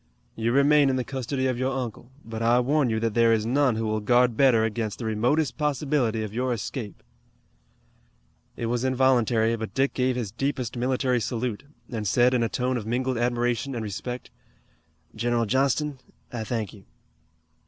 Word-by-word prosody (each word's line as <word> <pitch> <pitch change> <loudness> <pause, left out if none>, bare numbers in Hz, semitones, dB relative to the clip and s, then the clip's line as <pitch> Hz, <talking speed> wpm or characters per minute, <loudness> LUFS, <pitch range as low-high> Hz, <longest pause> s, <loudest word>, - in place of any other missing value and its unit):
You 115 +1 0
remain 140 +2 +5
in 130 - +1
the 130 - 0
custody 130 +1 -3
of 130 -2 0
your 135 +1 0
uncle, 120 -1 -5 0.2
but 115 0 -6
I 120 +2 +4
warn 135 +1 +2
you 110 -1 0
that 115 -2 0
there 115 0 +4
is 110 -1 +2
none 130 0 +2
who 110 0 -2
will 110 0 0
guard 120 +2 +3
better 125 -3 +4
against 110 -1 -2
the 120 - -6
remotest 120 +6 0
possibility 140 -6 0
of 105 -1 -6
your 125 +2 0
escape." 115 -1 -6 1.5
It 115 - -3
was 120 +1 -1
involuntary, 125 -3 +2
but 110 -1 -6
Dick 135 +1 +1
gave 130 -1 +1
his 115 -6 -3
deepest 130 0 -2
military 125 0 0
salute, 115 +1 -3 0.3
and 110 -3 -3
said 125 +5 +4
in 125 - +2
a 115 - +1
tone 125 +2 -1
of 110 -2 -6
mingled 125 +1 -1
admiration 120 +2 0
and 115 - -3
respect: 120 +4 -6 0.8
"General 120 +1 0
Johnston, 135 +4 0 0.3
I 115 -2 -3
thank 110 -3 -3
you." 100 -3 -15
120 Hz, 175 wpm, -26 LUFS, 115-130 Hz, 1.5 s, remain